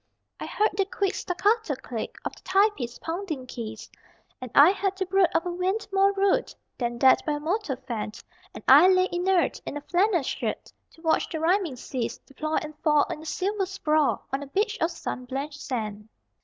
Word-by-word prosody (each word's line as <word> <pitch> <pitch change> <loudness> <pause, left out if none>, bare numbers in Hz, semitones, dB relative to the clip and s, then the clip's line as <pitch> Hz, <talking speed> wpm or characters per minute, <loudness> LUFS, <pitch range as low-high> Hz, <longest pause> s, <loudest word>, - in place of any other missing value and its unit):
I - - -5
heard 430 +1 +1
the 390 0 +2
quick 395 0 -1
staccato 405 -2 0
click 245 -3 -6
Of - - -4
the - - -17
typist's 380 - +1
pounding 325 -6 -4
keys, 225 -3 -7 0.5
And 255 - -6
I 295 +6 +9
had 390 -1 -2
to 380 - -1
brood 380 0 +4
of 330 - +2
a 355 - -2
wind 375 +5 -1
more 390 0 +4
rude 395 -1 +1 0.2
Than 240 -1 -2
that 260 +2 +5
by 305 - -1
a 295 - -2
motor 320 -1 -1
fanned 230 -5 -6 0.3
And - - -9
I 365 - +9
lay 370 0 +4
inert 355 0 +1
in 290 - -5
a - - -6
flannel 360 0 +2
shirt - - -4 0.2
To 325 - -19
watch 320 -1 +2
the 320 - -4
rhyming 340 -2 +1
seas 250 -1 -4
Deploy 310 +3 -5
and 305 0 -8
fall 300 -2 +4
in 305 - -5
a - - -11
silver 390 +4 -1
sprawl 310 -6 +1
On 270 - 0
a 285 - -7
beach 415 +9 0
of 330 - +3
sun 255 -6 -5
blanched 280 +3 -5
sand. 215 -4 -4
325 Hz, 195 wpm, -26 LUFS, 270-385 Hz, 0.5 s, I